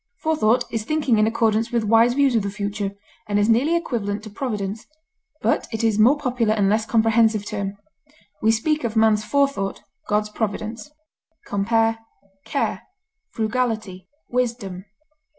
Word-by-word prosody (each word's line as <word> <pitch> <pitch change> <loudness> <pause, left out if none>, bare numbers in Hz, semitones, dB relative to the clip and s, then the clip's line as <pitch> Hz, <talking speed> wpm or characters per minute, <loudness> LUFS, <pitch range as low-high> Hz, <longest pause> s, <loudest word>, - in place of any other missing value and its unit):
Forethought 280 -8 +2
is 225 -2 -2
thinking 285 -4 +1
in 215 - +4
accordance 225 0 +1
with 235 -2 +1
wise 230 +3 +4
views 280 -2 +3
of 225 - +3
the 200 - -3
future, 200 0 -3 0.3
and 205 -1 0
is 205 0 +3
nearly 255 +9 +3
equivalent 215 -10 -2
to 215 - -9
providence, 210 -3 -4 0.6
but - - +1
it 220 -1 -3
is 220 -2 +2
a - - +6
more 260 +7 +5
popular 245 -6 0
and 205 -2 +2
less 215 +1 +1
comprehensive 225 -1 +3
term; 200 -1 -4 0.6
we 220 - +3
speak 300 +7 0
of 230 -1 -2
man's 220 -1 +3
forethought, 275 -3 0 0.2
God's 210 0 0
providence. 220 +4 -4 0.6
Compare 225 +3 +1 0.5
CARE; 280 +5 -1 0.5
FRUGALITY; 220 -4 -2 0.2
WISDOM. 230 -7 -2
220 Hz, 150 wpm, -22 LUFS, 210-240 Hz, 0.6 s, a